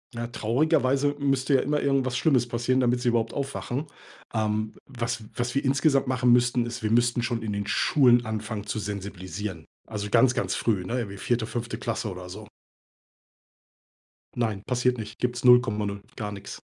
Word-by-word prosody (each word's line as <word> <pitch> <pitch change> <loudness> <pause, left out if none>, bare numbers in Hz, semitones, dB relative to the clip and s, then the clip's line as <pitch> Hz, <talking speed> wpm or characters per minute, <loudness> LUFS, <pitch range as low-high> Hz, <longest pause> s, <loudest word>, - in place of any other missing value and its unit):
Ja, 120 0 -3
traurigerweise 135 +4 +1
müsste 135 0 +2
ja 130 - +4
immer 150 +1 0
irgendwas 135 -2 +1
Schlimmes 130 -7 +3
passieren, 120 +2 0
damit 125 -1 +2
sie 125 - +2
überhaupt 115 -1 0
aufwachen. 140 +1 -3 0.5
Ähm, 110 -1 -1
was 120 -3 -4
was 120 0 -2
wir 140 +1 0
insgesamt 135 0 +3
machen 125 -1 +2
müssten, 120 0 +3
ist, 120 +1 -5
wir 110 -1 -1
müssten 120 +1 +3
schon 120 -1 -2
in 110 -1 -3
den 100 0 -3
Schulen 120 0 +4
anfangen 110 -1 -4
zu 105 +1 -3
sensibilisieren. 100 -3 -5 0.2
Also 105 -2 -5
ganz, 120 +4 +5
ganz 125 - -1
früh, 100 -6 0
ne, 120 +7 -1
irgendwie 100 -4 -5
4., 115 +3 0
5. 120 +1 -4
Klasse 115 -1 -3
oder 90 -1 -8
so. 105 +3 -9 1.9
Nein, 110 -5 -1
passiert 125 +1 +1
nicht. 110 -1 -7
Gibt's 120 -1 -2
0,0, 105 -5 +4
gar 105 -4 -4
nix. 100 -1 -8
120 Hz, 170 wpm, -26 LUFS, 105-125 Hz, 1.9 s, ganz